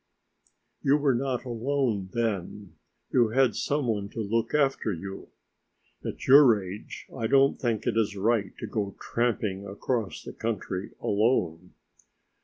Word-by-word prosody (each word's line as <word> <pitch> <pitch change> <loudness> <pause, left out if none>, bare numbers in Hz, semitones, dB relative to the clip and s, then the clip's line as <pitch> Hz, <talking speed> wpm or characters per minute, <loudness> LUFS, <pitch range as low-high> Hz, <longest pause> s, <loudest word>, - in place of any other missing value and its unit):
"You 140 +1 +4
were 140 -2 +2
not 125 0 -1
alone 120 -5 -1
then; 105 -4 -3 0.4
you 120 -3 +4
had 130 0 +3
some 145 -1 0
one 105 -4 -1
to 115 - -8
look 115 +5 0
after 135 -6 +2
you. 95 +2 -7 0.7
At - - -5
your 130 -5 +7
age 95 +2 -8
I 115 -3 -1
don't 135 +2 +4
think 115 -4 -1
it 120 - 0
is 105 -2 +1
right 105 -1 0
to - - -5
go 100 -3 -3
tramping 105 -5 -1
across 100 -2 -3
the - - -8
country 100 -4 -3
alone." 90 -6 0
115 Hz, 140 wpm, -27 LUFS, 100-130 Hz, 0.7 s, your